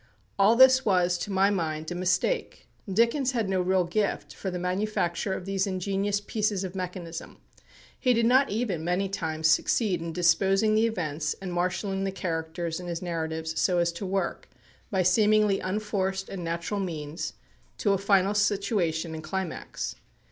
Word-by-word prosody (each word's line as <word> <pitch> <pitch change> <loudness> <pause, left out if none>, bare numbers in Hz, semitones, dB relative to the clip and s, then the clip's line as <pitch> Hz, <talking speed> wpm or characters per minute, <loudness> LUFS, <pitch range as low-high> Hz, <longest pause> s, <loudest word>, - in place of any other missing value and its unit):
All 205 +4 +6
this 260 +1 +7
was, 180 -4 +2
to 205 - -4
my 195 +1 +3
mind, 160 -4 -2
a - - -1
mistake. 185 - -1 0.2
Dickens 235 +6 +2
had 225 -4 0
no 190 -1 +1
real 185 0 +2
gift 200 +4 -2
for 195 - -5
the 180 - -3
manufacture 180 0 -1
of 185 - -5
these 195 0 0
ingenious 195 +2 -1
pieces 205 -1 -1
of 185 -1 -5
mechanism. 180 -3 -6 0.6
He 255 - +3
did 230 0 +2
not 260 +4 +4
even 205 -6 -2
many 180 +3 0
times 160 -4 -1
succeed 180 +3 +2
in 165 0 -4
disposing 195 +5 +3
the 220 +1 +4
events 155 -7 -2
and 185 -2 -5
marshalling 185 +2 -1
the 195 - -1
characters 165 -2 -3
in 180 - -7
his 170 0 -4
narratives 160 -2 -3
so 180 -2 +2
as 170 0 +2
to 170 +4 -6
work, 195 +1 -2 0.4
by 190 -2 +1
seemingly 210 +1 +4
unforced 190 -1 -2
and 185 -3 -5
natural 170 +5 -2
means, 160 -4 -4 0.4
to 200 - +2
a 195 - 0
final 195 0 +3
situation 195 -5 0
and 160 0 -6
climax. 185 +2 -4
190 Hz, 165 wpm, -27 LUFS, 170-205 Hz, 0.6 s, this